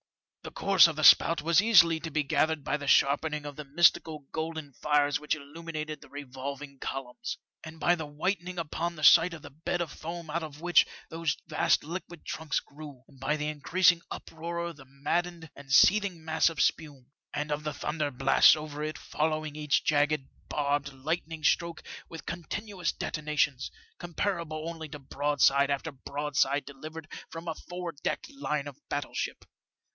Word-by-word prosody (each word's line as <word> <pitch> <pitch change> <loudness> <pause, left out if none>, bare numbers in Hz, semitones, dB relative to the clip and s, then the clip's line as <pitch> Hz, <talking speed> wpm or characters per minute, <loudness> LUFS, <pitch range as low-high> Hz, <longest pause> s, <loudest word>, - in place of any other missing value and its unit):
The - - -7
course 195 -3 +6
of 165 - -4
the 155 - -3
spout 165 +1 +7
was 170 +3 +5
easily 175 -7 +6
to 165 +1 -5
be 150 0 0
gathered 155 +1 +1
by - - 0
the 145 -1 -5
sharpening 150 +2 +3
of 145 -1 -6
the 150 - -6
mystical 155 0 +2
golden 160 -3 -4
fires 145 0 +1
which 150 +1 -1
illuminated 155 +1 -7
the - - -15
revolving 140 0 -7
columns, 135 +5 -5 0.3
and 160 0 -10
by 175 +2 +4
the 160 -3 -3
whitening 180 +4 -2
upon 170 +1 -3
the 155 - -9
sight 165 +3 +7
of 155 - -12
the 145 - -10
bed 160 +4 -3
of 165 -3 -3
foam 165 0 -7
out 170 +2 -1
of 150 -2 -8
which 175 0 +4 0.2
those 165 -1 -1
vast 155 - +2
liquid 175 +1 -7
trunks 160 -2 -2
grew, 145 -3 -12
and 135 - -20
by 140 +4 0
the 150 0 -2
increasing 170 +4 +3
uproar 170 +1 -5
of 170 -3 -6
the 135 - -14
maddened 165 +5 -3
and 140 -1 -12
seething 180 +3 +4
mass 160 +1 +3
of 165 -4 -8
spume, 140 -5 -1 0.2
and 150 0 -3
of 150 +1 -2
the 150 - -2
thunder 150 -2 -2
blasts 135 +3 +6
over 150 -1 -6
it 155 0 -3
following 155 -1 -2
each 150 -2 +1
jagged, 150 -2 +2 0.2
barbed 145 -1 0
lightning 155 +3 -4
stroke 170 0 +1 0.3
with 165 - -9
continuous 185 +2 -3
detonations, 150 -3 -1 0.3
comparable 170 -3 -3
only 165 -2 -6
to 150 - -7
broadside 140 -1 +2
after 140 +3 -2
broadside 140 +1 -1
delivered 155 +3 -9 0.2
from 165 +1 -8
a 165 - -1
four 175 +1 -6
decked - - -3
line 150 - -3
of 145 - -8
battle 145 -1 -3
ship. - - -4
155 Hz, 175 wpm, -29 LUFS, 145-165 Hz, 0.3 s, spout